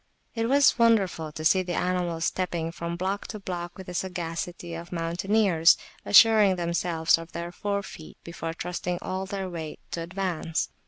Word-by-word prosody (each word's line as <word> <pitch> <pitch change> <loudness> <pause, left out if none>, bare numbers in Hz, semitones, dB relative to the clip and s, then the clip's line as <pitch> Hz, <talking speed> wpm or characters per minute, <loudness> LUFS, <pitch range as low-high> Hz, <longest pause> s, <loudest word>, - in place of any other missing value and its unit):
It 230 -1 -1
was 275 -2 +5
wonderful 195 -9 +2
to 155 +1 -7
see 185 +4 +5
the 175 -1 -3
animals 175 -2 -1
stepping 170 -3 -2
from 170 0 -4
block 190 +3 -2
to 215 - -6
block 175 -3 -5
with 190 - -9
the 180 - -7
sagacity 175 -1 -4
of 170 +1 -7
mountaineers; 175 +1 +3 0.3
assuring 210 -2 +6
themselves 170 -2 +1
of 165 +1 -11
their 170 +1 -5
forefeet 200 -4 -5
before 165 -1 -5
trusting 175 +1 -3
all 190 +1 -3
their 195 -1 -4
weight 165 -4 -6
to 170 - -3
advance. 170 -2 -2
175 Hz, 160 wpm, -27 LUFS, 170-190 Hz, 0.3 s, assuring